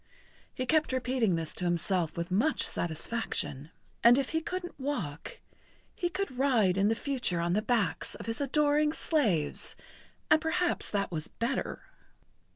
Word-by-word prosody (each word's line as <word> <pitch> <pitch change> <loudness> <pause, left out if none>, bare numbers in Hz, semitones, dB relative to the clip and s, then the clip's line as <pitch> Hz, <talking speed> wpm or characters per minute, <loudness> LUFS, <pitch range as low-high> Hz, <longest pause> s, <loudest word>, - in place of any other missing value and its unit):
He 255 - -4
kept 310 +2 +2
repeating 250 -6 +1
this 165 -1 -2
to 180 - -3
himself 175 -1 0
with 170 +1 -3
much[Pg 235 +12 +2
77] - - 0
satisfaction. 160 - -2 0.3
And 240 +2 +8
if 275 -2 0
he 320 0 0
couldn't 355 -1 -5
walk, 205 - -4 0.5
he 350 - -2
could 355 -8 -4
ride 230 -9 +3
in 195 +1 +3
the 225 - +2
future 245 -9 0
on 170 +1 0
the 210 - +2
backs 225 -3 0
of - - -9
his 225 +4 -3
adoring 300 +2 +2
slaves 210 - +1 0.6
and 315 - +6
perhaps 345 +2 0
that 200 -1 -1
was 155 -2 -3
better. 235 +3 -3
235 Hz, 160 wpm, -30 LUFS, 180-290 Hz, 0.6 s, And